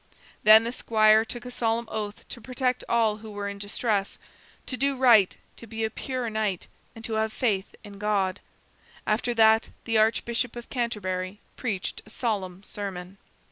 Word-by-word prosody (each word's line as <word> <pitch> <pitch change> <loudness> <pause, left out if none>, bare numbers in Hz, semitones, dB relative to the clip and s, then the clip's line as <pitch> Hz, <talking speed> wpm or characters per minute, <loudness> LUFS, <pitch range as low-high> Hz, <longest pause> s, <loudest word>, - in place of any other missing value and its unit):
Then 215 +1 +8
the 230 - -2
squire 215 -2 +4
took 240 +2 -8
a 250 - -6
solemn 230 -1 0
oath 210 -1 -5
to 235 - -8
protect 255 0 -1
all 225 -3 +2
who 220 0 -10
were 205 -1 -4
in 200 0 -6
distress, 205 0 -1 0.5
to 255 - -4
do 275 +3 +1
right, 235 -7 +5 0.2
to 230 - -11
be 225 0 -4
a 220 - 0
pure 255 +1 -3
knight, 215 -4 -1 0.3
and 225 0 -8
to 225 - -3
have 220 0 -1
faith 205 -5 -1
in 200 -2 -11
God. 205 -2 0 0.7
After 235 +3 0
that 220 0 +5 0.2
the 225 -2 +2
Archbishop 230 +2 +1
of 240 -1 -9
Canterbury 205 -6 -2 0.2
preached 205 -7 -3
a - - -17
solemn 200 -5 -3
sermon. 195 -2 -6
220 Hz, 170 wpm, -26 LUFS, 205-235 Hz, 0.7 s, Then